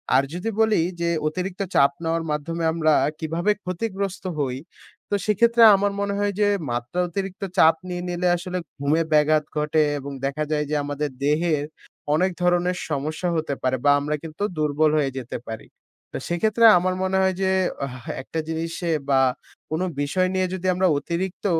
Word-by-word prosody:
আর 135 - +5
যদি 180 +6 -3
বলি 220 -4 +3 0.2
যে, 170 - +1 0.2
অতিরিক্ত 185 +4 -3
চাপ 140 0 +5
নেওয়ার 165 0 0
মাধ্যমে 165 +3 -3
আমরা 155 -2 +2 0.3
কীভাবে 165 +5 0
ক্ষতিগ্রস্ত 195 +1 -3 0.2
হই? 130 -3 -1 0.5
তো - - +1
সেক্ষেত্রে 235 +3 +4
আমার 200 +1 +1
মনে 200 0 -1
হয় 205 0 0
যে, 205 - +4 0.2
মাত্রা 120 +8 -3
অতিরিক্ত 195 +2 -5
চাপ 160 -2 +6
নিয়ে 180 0 -4
নিলে 175 +1 -1
আসলে, 180 +1 -4 0.2
ঘুমের 155 +3 +1
ব্যাঘাত 150 0 +4
ঘটে 150 +1 +2 0.2
এবং 140 +1 -7
দেখা 140 +3 -1
যায় 150 -1 +1
যে, 150 - 0
আমাদের 145 +1 -3
দেহের 150 0 +1 0.5
অনেক 185 +4 +2
ধরনের 180 0 +2
সমস্যা 155 +4 -2
হতে 155 -3 -1
পারে 130 0 +1
বা 145 - +7
আমরা 150 +1 -2
কিন্তু 160 +5 -6
দুর্বল 150 0 +2
হয়ে 140 -3 +1
যেতে 125 -2 -5
পারি। 110 0 -7 0.4
তো - - -4
সেক্ষেত্রে 215 +6 +2
আমার 185 +1 0
মনে 190 0 +1
হয় 190 -1 +2
যে, 190 - +2 0.4
হা 130 - -9 0.2
১ - - -18
টা 160 - 0
জিনিসে 165 +1 -3 0.2
বা 135 -1 +4 0.5
কোনো 160 +4 0 0.2
বিষয় 185 +6 +1
নিয়ে 185 0 +1
যদি 185 0 -3
আমরা 185 +1 +2
অতিরিক্ত 175 +6 -4
165 Hz, 170 wpm, -23 LUFS, 150-185 Hz, 0.5 s, বা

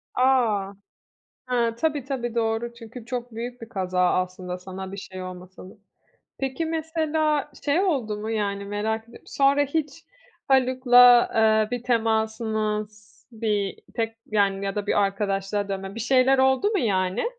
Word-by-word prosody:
A! 230 -7 +2 0.8
He, 235 -2 +2
tabii, 290 +1 -1
tabii, 240 -4 -4
doğru, 230 +1 -1
çünkü 235 0 -11
çok 245 -1 -5
büyük 240 +2 -6
bir 230 - -9
kaza 185 -4 -2
aslında 185 0 -3
sana 190 +1 -8
bir 195 - -7
şey 185 -1 -8
olmasa 185 0 -10
da. - - -14 0.7
Peki, 270 +4 -2
mesela 315 -2 -1
şey 295 +5 +2
oldu 265 - 0
mu? 220 +1 -4
Yani, 200 -2 -2
merak 215 +2 -2
ediyorum, 235 - -17
sonra 280 +1 +3
hiç 295 +1 -3 0.4
Haluk'la, 250 -2 +6
eee, 220 0 +3
bir - - -15
temasınız, 220 -2 -1
bir 210 -3 -1 0.2
tek 225 -1 -2
yani, 200 -2 +1
ya 195 -1 -2
da 205 -1 -3
bir 205 - +2
arkadaşlığa 200 0 -1
dönme, 195 0 -5
bir 230 - -6
şeyler 260 +3 +3
oldu 265 +10 +3
mu 415 - +1
yani? 190 - 0
225 Hz, 150 wpm, -24 LUFS, 200-255 Hz, 0.8 s, Haluk'la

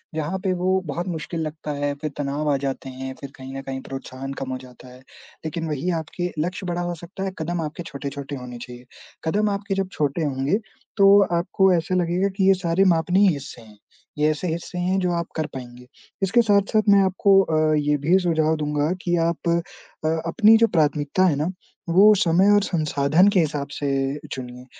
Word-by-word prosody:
जहाँ 160 +4 -2
पे 185 -1 0
वो 185 +1 +1
बहुत 170 +5 -4
मुश्किल 165 -1 -4
लगता 155 -1 -5
है, 145 0 -1
फिर 155 - -2
तनाव 145 +1 -2
आ - - +3
जाते 135 0 -4
हैं, 130 0 -6
फिर 140 - -8
कहीं 130 0 -9
न 135 - -4
कहीं 135 -1 -6
प्रोत्साहन 135 0 -7
कम 135 -1 -6
हो 130 - -2
जाता 125 0 -14
है। 125 0 -14 0.5
लेकिन 165 +1 -3
वही 155 +3 -2
आपके 175 +3 -4
लक्ष्य 180 +4 -3
बड़ा 175 0 -2
हो 175 0 -2
सकता 175 +4 -8
है, 195 - -2
कदम 170 +1 -2
आपके 155 +2 -5
छोटे-छोटे 140 -1 -6
होने 125 -1 -8
चाहिए, 125 +1 -10 0.4
कदम 205 +6 +1
आपके 200 0 -2
जब 195 -1 -1
छोटे 150 +1 -1
होंगे, 140 +8 0 0.4
तो 200 0 +7 0.2
आपको 190 +2 +2
ऐसे 175 +2 0
लगेगा 180 +2 +1
कि 190 -1 +3
ये 195 - +7
सारे 180 0 +1
मापनीय 180 +5 +3
हिस्से 140 -4 -8
हैं, 110 -2 -17 0.4
ये 150 +1 +3
ऐसे 155 +4 -3
हिस्से 170 +2 -4
हैं 185 +2 +1
जो 180 -1 0
आप 170 0 -2
कर 155 - -1
पाएँगे। 125 -1 -9 0.4
इसके 225 +6 +4
साथ-साथ 210 0 +2
मैं 200 -1 +7
आपको 195 +1 +4
अ, 155 -3 +1
ये 150 0 +1
भी 160 +7 +3
सुझाव 160 -3 +1
दूँगा 150 0 -1
कि 175 -1 0
आप 170 0 -2
अ, 170 - +3 0.7
अपनी 220 +5 +5
जो 230 +1 +4
प्राथमिकता 150 +3 +2
है 165 -6 +3
ना, 150 +5 -1 0.4
वो 200 +5 +7
समय 185 +1 +3
और 205 - +4
संसाधन 155 0 +2
के 200 - +2
हिसाब 150 -3 -1
से 145 - -3 0.4
चुनिए, 125 -1 -7
160 Hz, 200 wpm, -23 LUFS, 140-185 Hz, 0.7 s, तो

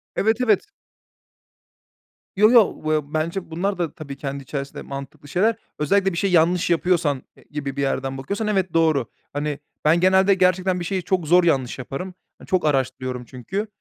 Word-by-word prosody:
Evet, 220 +2 +2
evet. 220 -6 +3 1.7
Yo, 210 +3 +6
yo, 235 -5 +6
vıya 155 -1 -1
bence 165 +3 -2
bunlar 190 +4 -1
da 170 -3 -2
tabii 140 -3 -8
kendi 140 -1 -5
içerisinde 140 +1 -5
mantıklı 140 +1 -8
şeyler. 210 +9 +2 0.2
Özellikle 195 +6 +2
bir - - -4
şeyi 195 0 0
yanlış 170 +1 +3
yapıyorsan, 170 -5 +1 0.2
eee, - - -19
gibi 145 -2 -4
bir 140 - -2
yerden 135 -1 -1
bakıyorsan 200 +11 -3
evet 190 -4 0
doğru. 155 -7 +2 0.3
Hani, 145 0 -2 0.3
ben, 160 +3 +5
genelde 190 +2 +5
gerçekten 185 0 +2
bir 175 - -4
şeyi 185 0 -2
çok 180 -4 0
zor 175 +3 +5
yanlış 135 -8 +1
yaparım. 135 +9 -6 0.2
Hani, - - -15
çok 185 -3 +1
araştırıyorum 130 -3 -1
çünkü. 160 - -4
165 Hz, 170 wpm, -22 LUFS, 140-190 Hz, 1.7 s, Yo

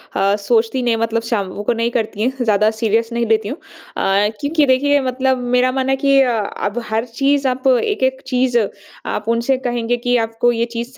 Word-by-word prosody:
अ, 200 +1 +2
सोचती 225 +4 +1
नहीं 235 -2 +1
मतलब 230 0 -1
शाम 200 -5 -1
को 225 - +1
नहीं 230 +1 -1
करती 220 -3 -2
हैं 255 +2 -1
ज़्यादा 215 -1 +3
सीरियस 225 +1 0
नहीं 235 0 0
लेती 220 -1 +1
हूँ। 275 - -5
अ, 205 - -2
क्योंकि 300 +1 +1
देखिए 285 +2 +3
मतलब 260 0 0 0.2
मेरा 250 +1 +3
मानना 265 0 -1
है - - +3
कि 275 0 +3
अ, 255 -2 +2 0.3
अब 205 +4 -2
हर 220 +2 -1
चीज़ 275 +3 0
आप 260 +1 -1
एक-एक 265 - +1
चीज़ 250 -1 +1 0.5
आप 210 - -4
उनसे 235 +3 +1
कहेंगे 240 -2 -2
कि 245 +1 0
आपको 225 +2 0
ये 235 0 0
चीज़ 235 +1 -4
240 Hz, 195 wpm, -18 LUFS, 225-265 Hz, 0.5 s, ज़्यादा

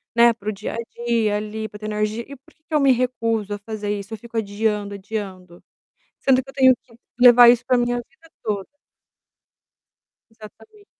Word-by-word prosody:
né, 235 0 +6
para 215 -2 -14
o - - +1
dia 200 +1 -6
a - - -5 0.3
dia 225 -3 +1
ali, 215 +1 -4
para 210 - -12
ter - - -6
energia, 215 +2 -2
e 280 - -9
por 300 +6 -25
que 310 - -44
que 315 - -12
eu 300 - +4
me 275 -2 +4
recuso 230 -4 -1
a - - -3
fazer 210 0 -6
isso? 200 +2 -9
Eu - - -5
fico 230 +2 -9
adiando, 205 -1 -1
adiando? 190 -3 -7 0.6
Sendo 260 -1 +3
que 270 - -17
eu - - -11
tenho 260 -2 +5
que 230 - -22 0.2
levar 245 -1 +9
isso 240 0 +4
para 255 0 +2
minha 245 0 0
a - - -3
vida 320 +6 -24
toda. 205 -3 -2 1.7
Exatamente. 330 - -16
225 Hz, 200 wpm, -22 LUFS, 210-245 Hz, 1.7 s, levar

